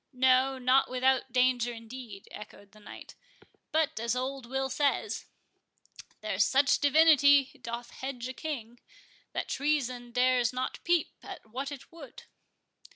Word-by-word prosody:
"No, 260 +1 +3
not 260 +1 +3
without 255 0 +1
danger, 250 -1 +2
indeed," 230 -3 -10
echoed 205 -1 -11
the 215 - -18
knight; 210 - -11 0.6
"but, 315 -7 0
as 235 +2 -1
old 260 0 -4
Will 265 +1 -1
says,— 280 +2 -1 0.9
'There's - - +1
such 275 +1 +3
divinity 285 -2 +5
doth 235 +1 -6
hedge 255 -2 -6
a 255 - -6
king, 245 -5 -6 0.5
That - - -3
treason 255 -4 -1
dares 250 -1 +2
not 255 0 -4
peep 345 -2 +1
at 385 - -10
what 260 +6 -5
it 280 -2 -10
would. 335 - -12
255 Hz, 135 wpm, -29 LUFS, 240-280 Hz, 0.9 s, divinity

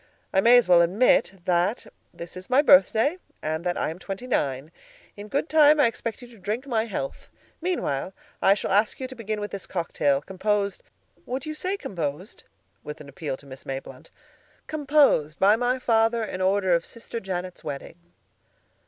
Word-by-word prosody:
I 190 - +4
may 240 +4 +7
as 245 - +3
well 175 -1 +6
admit 190 0 +2
that 180 +5 +1 0.3
this 170 +1 -10
is 185 0 -10
my 265 +3 +4
birthday, 225 - +5 0.2
and 160 +1 -2
that 175 -1 -1
I - - -1
am 165 - -9
twenty 195 +5 -6
nine. 140 - -1 0.4
In 205 0 -9
good 280 +7 -1
time 305 -1 +5
I 290 - +6
expect 230 +1 -3
you - - -10
to 230 -3 -17
drink 215 +7 -3
my 230 -5 0
health. 160 -11 -5 0.3
Meanwhile, 190 - -2 0.3
I 195 - +5
shall 205 - -4
ask 205 +3 +2
you 260 - -3
to 260 - -10
begin 215 -2 -4
with 205 0 -5
this 200 - -6
cocktail, 145 -5 0
composed—would 200 - -4
you 310 - -4
say 370 +6 -3
'composed?'" 170 - -5 0.4
with 150 - -8
an 145 -2 -11
appeal 140 -1 -5
to 140 - -17
Miss 135 0 -11
Mayblunt—"composed 290 - -1
by 200 +2 +5
my 245 +2 0
father 230 -2 +2
in 185 -3 -5
honor 190 -1 +2
of 170 0 +2
Sister 230 0 -7
Janet's 185 -2 -5
wedding." 145 +3 -7
200 Hz, 175 wpm, -25 LUFS, 170-245 Hz, 0.4 s, may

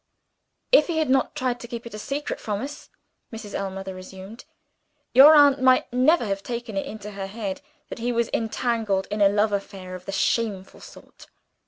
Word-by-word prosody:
"If - - +6
he 335 -3 -2
had 310 -5 +1
not 265 -1 +1
tried 250 -1 -2
to 235 - -9
keep 235 0 -7
it 235 - -8
secret 280 +6 -4
from 210 +1 -3
us," 285 +1 -8 0.4
Mrs. 220 -3 -9
Ellmother 195 -1 -4
resumed, 190 +4 -11 0.7
"your 290 +4 +9
aunt 285 -2 +6
might 255 -1 +3
never 260 +3 +3
have 195 -1 -2
taken 235 -1 -6
it 195 - -2
into 210 -1 -8
her 195 -1 -6
head 200 -2 -5 0.3
that - - -7
he 240 +2 -1
was 235 -1 -1
entangled 225 -3 -1
in 210 0 -2
a 200 - +6
love 210 +1 +1
affair 195 -2 -5
of 185 0 -9
the - - -5
shameful 195 0 -1
sort. - - -15
220 Hz, 185 wpm, -24 LUFS, 195-250 Hz, 0.7 s, your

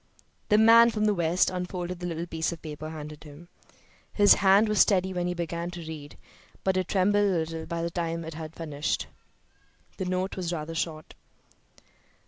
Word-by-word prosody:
The 210 - +5
man 230 +2 +7
from 215 -2 -1
the 210 - +3
West 175 0 +1
unfolded 180 -1 -4
the 175 - -4
little 170 0 -3
piece 160 -1 -2
of 165 - -9
paper 155 0 -7
handed 150 -1 -8
him. 155 +3 -13 0.6
His 205 -1 +6
hand 195 +3 +5
was 210 -1 0
steady 190 -2 +3
when 175 -1 -1
he 180 - -2
began 170 0 -3
to 175 0 -8
read, 150 -3 -9 0.5
but 190 -1 +1
it 185 -1 0
trembled 205 +2 +2
a 205 - +3
little 160 -2 -2
by 170 0 -3
the 170 - -2
time 165 -1 -3
he 160 - -7
had 160 0 -8
finished. 150 -2 -2 0.9
The 190 - -3
note 185 +1 -2
was 180 -2 -3
rather 165 -1 -4
short. 160 -1 -4
175 Hz, 185 wpm, -27 LUFS, 160-190 Hz, 0.9 s, man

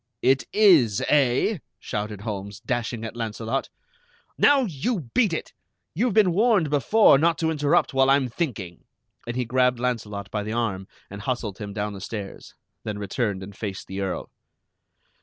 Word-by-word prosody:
"It 130 +1 +3
is, 165 - +5
eh?" 145 - +2 0.2
shouted 105 -1 -5
Holmes, 100 -2 -5
dashing 120 0 -3
at 115 - -7
Launcelot. 115 +2 -3 0.7
"Now, 285 -1 +5
you 175 - -3
beat 225 -7 +3
it! 160 - -4 0.4
You've 225 +5 0
been 205 -5 +5
warned 200 - +3
before 145 - +5
not 165 0 +2
to 160 +1 0
interrupt 150 +1 +2
while 135 0 +4
I'm 135 -1 +4
thinking." 110 - -4 0.4
And 120 - -3
he 125 -1 -1
grabbed 125 0 +2
Launcelot 105 -6 -3
by 105 - -1
the 105 +1 -4
arm 100 -5 -2 0.2
and 100 0 -7
hustled 115 -4 -3
him 105 -2 -6
down 105 0 -3
the 95 - -9
stairs, 100 -1 -7 0.3
then 105 -1 -4
returned 100 -1 -2
and 100 +1 -10
faced 100 -3 -5
the 95 +1 -5
Earl. 95 -2 -4
120 Hz, 160 wpm, -24 LUFS, 105-150 Hz, 0.7 s, is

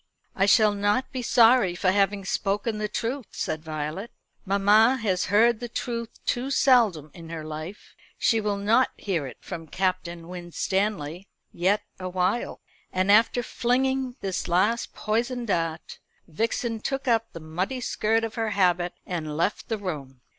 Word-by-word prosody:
"I 195 0 +2
shall 215 0 +5
not 205 +5 0
be 260 -2 -3
sorry 235 -5 +5
for 185 +1 +2
having 200 0 +1
spoken 205 +3 -1
the 210 - -1
truth," 230 +4 -3
said 155 0 -3
Violet. 155 +7 -4 0.4
"Mamma 210 +6 +5
has 195 -6 0
heard 220 +3 +4
the 240 - -6
truth 235 -1 -3 0.2
too 250 +3 -1
seldom 225 - +3
in 165 -2 -11
her 165 -2 -5
life. 155 +6 -8 0.2
She 225 -1 +2
will 205 -1 -1
not 220 +6 +3
hear 170 -8 -2
it 130 - -10
from 165 -3 -7
Captain 175 -1 -2
Winstanley 180 0 -2 0.3
yet 190 +4 +1 0.2
awhile." 185 +4 -1 0.3
And 185 +2 +2
after 230 +3 +4
flinging 260 +2 0
this 190 -2 -3
last 205 +7 +1
poisoned 235 +2 -1
dart, 165 -3 -2 0.3
Vixen 225 +6 -2
took 270 +4 -3
up 230 -2 +2
the 165 - -7
muddy 180 +11 -3
skirt 225 -1 0
of 225 -1 -3
her 225 -1 -1
habit 180 -2 +2
and 155 -4 -4
left 185 +8 -1
the 225 - 0
room. 145 -10 -6
200 Hz, 155 wpm, -26 LUFS, 175-230 Hz, 0.4 s, shall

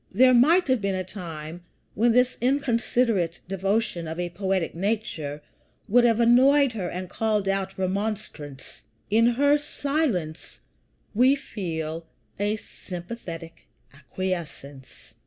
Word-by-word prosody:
There 255 +6 +5
might 320 +9 +5
have 260 -4 +2
been 200 -1 0
a 185 - -2
time 170 -3 -8 0.3
when 235 +3 +3
this 250 +2 +3
inconsiderate 235 - +1
devotion 195 -2 -1
of 160 +2 -5
a 175 -1 -2
poetic 190 -1 -1
nature 170 -7 -3 0.4
would 240 +3 +5
have 230 -1 +3
annoyed 260 +4 +5
her 195 -6 -4
and 185 +1 -5
called 210 0 -1
out 195 0 -1
remonstrance. 190 -7 -4 0.3
In 225 +2 +5
her 285 +4 +3
silence 275 - -2 0.5
we 255 +5 +5
feel 165 - -5 0.3
a 205 +1 +1
sympathetic 175 -4 -9 0.3
acquiescence. 150 -4 -6
195 Hz, 120 wpm, -25 LUFS, 170-240 Hz, 0.5 s, There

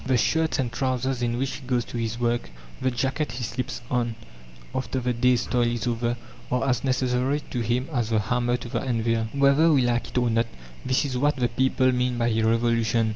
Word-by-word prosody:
The 130 -1 +2
shirt 160 +6 +1
and 130 -5 -1
trousers 130 +1 -1
in 120 0 0
which 135 +2 -2
he 130 - -13
goes 125 -2 +1
to - - -6
his 115 0 -2
work, 120 0 0 0.3
the 130 - +2
jacket 135 +2 -1
he 125 0 -4
slips 120 +2 -4
on 120 -2 0 0.6
after 130 0 -2
the 125 0 0
day's 125 0 +2
toil 120 -2 +1
is 120 -2 -2
over, 120 0 -1 0.3
are 125 +1 +1
as 125 -3 +1
necessary 130 +1 +1
to 125 - -2
him 120 +3 0
as 120 -4 0
the 110 - +2
hammer 120 +3 +1
to 125 - -8
the - - -2
anvil. 115 -3 0
Whether 140 +4 +4
we 135 -4 +4
like 120 -1 0
it - - -5
or 120 -1 +2
not, 115 +1 +2 0.4
this 130 +2 +1
is 125 -3 -2
what 145 +3 +2
the 125 -3 0
people 130 +1 +2
mean 125 0 0
by 120 0 +1
a 110 0 +1
revolution. 115 0 +2
125 Hz, 220 wpm, -25 LUFS, 120-130 Hz, 0.6 s, Whether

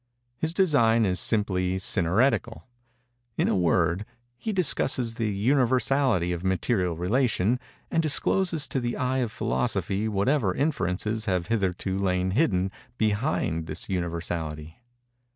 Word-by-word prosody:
His 160 +7 -3
design 115 - +3
is 90 -2 0
simply 95 -4 0
synœretical. 95 +7 +1 0.7
In - - +2
a - - +1
word, 90 +1 +1 0.4
he 220 - -3
discusses 135 - +1
the 115 -2 -2
universality 125 -3 +2
of 85 0 -5
material 95 -1 0
relation, 115 +3 +1 0.3
and 165 - +2
discloses 165 +1 +1
to 135 - -1
the 120 -1 -3
eye 130 +1 0
of 120 -4 -1
Philosophy 110 -3 -1
whatever 105 0 +1
inferences 110 - -1
have 90 0 -1
hitherto 95 -3 -1
lain 90 -1 0
hidden 95 - +1 0.3
behind 105 - 0
this - - -4
universality. 85 -3 -4
105 Hz, 120 wpm, -26 LUFS, 90-125 Hz, 0.7 s, design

